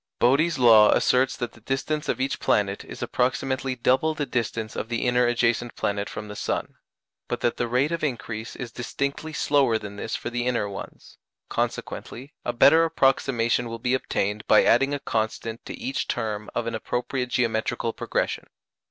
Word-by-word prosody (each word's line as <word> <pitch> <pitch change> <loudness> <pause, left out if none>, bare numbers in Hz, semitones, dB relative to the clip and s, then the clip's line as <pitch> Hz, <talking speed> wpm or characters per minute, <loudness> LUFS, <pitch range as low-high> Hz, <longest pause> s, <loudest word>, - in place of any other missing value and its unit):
Bode's 145 +7 +3
law 115 -4 +7
asserts 130 +1 +2
that 120 -2 -3
the 110 - -19
distance 135 +5 -2
of - - 0
each 135 +1 -1
planet 100 -1 +1
is - - -8
approximately 130 +1 -1
double 130 +6 +2
the 145 - -1
distance 115 -3 -3
of 110 - -4
the 115 +1 -1
inner 125 0 +3
adjacent 120 0 +1
planet 100 0 -2
from 105 - -7
the 105 - -8
sun, - - -2 0.5
but - - -3
that 120 - 0
the 120 - 0
rate 125 +6 +1
of 165 -1 -2
increase 115 -5 -3
is 120 -2 -6
distinctly 140 +6 -3
slower 140 -6 +2
than 105 -2 -8
this 110 +2 -3
for 120 - -5
the 120 0 -1
inner 115 -5 0
ones; 100 -1 -9 0.3
consequently 135 +5 -4
a - - -1
better 140 +7 +6
approximation 135 -6 +2
will 115 - -5
be 125 +2 -1
obtained 105 -5 -1
by 110 - +6
adding 135 +4 +4
a - - -4
constant 110 0 -3
to - - -6
each 260 +2 -3
term 110 -3 -3
of 120 - -1
an 115 - -3
appropriate 125 +3 -2
geometrical 115 -1 0
progression. - - -2
120 Hz, 180 wpm, -25 LUFS, 115-135 Hz, 0.5 s, law